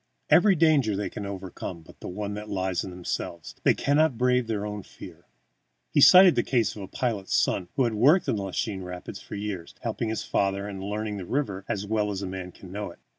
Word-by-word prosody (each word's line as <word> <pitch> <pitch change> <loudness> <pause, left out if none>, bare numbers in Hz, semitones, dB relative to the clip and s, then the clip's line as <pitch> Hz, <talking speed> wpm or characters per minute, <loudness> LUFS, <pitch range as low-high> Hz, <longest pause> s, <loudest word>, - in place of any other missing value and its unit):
Every 185 +6 +6
danger 150 - +3
they 100 +1 -3
can 100 - -5
overcome 95 -3 -6
but - - -17
the - - -8
one 100 +2 -4
that 105 +1 -7
lies 95 -3 -1
in - - -6
themselves. 90 -2 -5
They - - +4
cannot 145 -2 +2
brave 125 -1 +2
their 105 -2 -2
own 105 0 -4
fear. - - -13 0.6
He 145 - +3
cited 185 +3 +9
the - - +2
case 115 -6 0
of 105 - -8
a 95 - -6
pilot's 105 -3 -2
son 90 - +1
who 135 - +3
had 120 -2 +1
worked 145 - +4
in - - +1
the 100 - -2
Lachine 95 +1 -3
Rapids 90 +2 -7
for - - -8
years, 100 -4 -5
helping 115 - -2
his 110 - -2
father, 100 0 0
and 95 -2 -6
learned 105 0 -3
the 90 - -6
river 100 -9 -2
as 105 -1 -2
well 105 0 0
as 100 -1 -3
a - - -2
man 90 -1 -6
can 90 0 -13
know 105 0 -4
it. 85 - -13
105 Hz, 225 wpm, -26 LUFS, 95-120 Hz, 0.6 s, cited